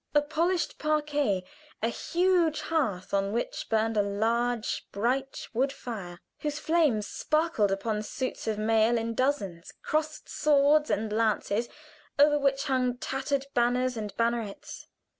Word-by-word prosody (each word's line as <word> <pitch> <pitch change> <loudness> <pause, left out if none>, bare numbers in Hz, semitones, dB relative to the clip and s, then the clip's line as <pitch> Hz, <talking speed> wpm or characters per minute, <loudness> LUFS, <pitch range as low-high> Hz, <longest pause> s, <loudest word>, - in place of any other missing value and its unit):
A 295 - +6
polished 335 +4 0
parquet 295 -10 +1 0.4
a 230 - +3
huge 345 +3 +1
hearth 215 - -1
on 195 0 +1
which 235 - -3
burned 225 0 +1
a 210 - +4
large 225 +3 -1
bright 255 +6 -1
wood 265 +4 +1
fire, 200 -10 -7 0.2
whose 295 -1 -2
flames 300 -11 +2
sparkled 305 -11 +1
upon 210 +2 -1
suits 255 +4 -4
of 215 -1 0
mail 225 +2 +3
in 230 0 -2
dozens 210 -10 -1
crossed 310 0 -2
swords 295 0 +3
and 210 0 -1
lances, 220 +1 +1 0.5
over 295 +1 +5
which 275 -1 +1
hung 255 -3 0
tattered 270 +2 -2
banners 245 +1 +2
and 210 -3 -5
bannerets. 230 -3 -2
245 Hz, 135 wpm, -28 LUFS, 215-295 Hz, 0.5 s, A